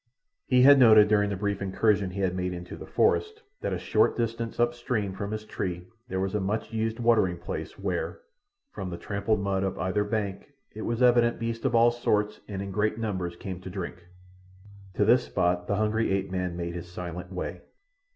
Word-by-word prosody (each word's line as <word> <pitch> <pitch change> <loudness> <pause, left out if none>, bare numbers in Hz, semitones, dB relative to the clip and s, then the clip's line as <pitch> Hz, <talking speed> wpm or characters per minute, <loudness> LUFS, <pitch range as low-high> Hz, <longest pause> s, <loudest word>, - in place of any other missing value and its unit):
He 125 -1 +5
had 140 +1 +8
noted 110 -4 +7
during 105 -1 +3
the 100 - -2
brief 100 +1 -2
incursion 100 0 +1
he 100 +2 -4
had 95 -2 +1
made 90 0 -2
into 90 0 -7
the - - -10
forest 435 +1 +1 0.2
that - - -2
a - - -1
short - - +2
distance 115 0 -2
up 120 0 +3
stream 120 -5 -2
from 100 +1 -4
his 110 0 -4
tree 90 -4 -4 0.2
there 95 - -3
was 95 0 -1
a 105 - +1
much 105 +4 -2
used 110 +1 -1
watering 110 -7 +3
place, 85 - -6
where, - - -3 0.5
from 95 - -5
the 85 - -5
trampled 100 +2 -1
mud 100 -1 0
of 95 -1 -2
either 95 +4 0
bank, 105 -2 -3 0.2
it 110 - -7
was 120 +2 0
evident 120 -1 +4
beasts 115 +1 -4
of 125 -3 +2
all 115 +1 +6
sorts 105 -3 0
and 100 -2 -4
in 100 - -6
great 105 +2 0
numbers 95 -6 -3
came 90 0 -7
to 95 - -7
drink. 90 -1 -6 0.9
To 105 - +3
this 120 +3 +4
spot 90 0 0
the 100 - +1
hungry 110 +1 +1
ape 95 0 -1
man 90 -2 -2
made 85 0 -3
his 85 0 -7
silent 90 +1 -6
way. 90 - -5
100 Hz, 205 wpm, -27 LUFS, 95-115 Hz, 0.9 s, had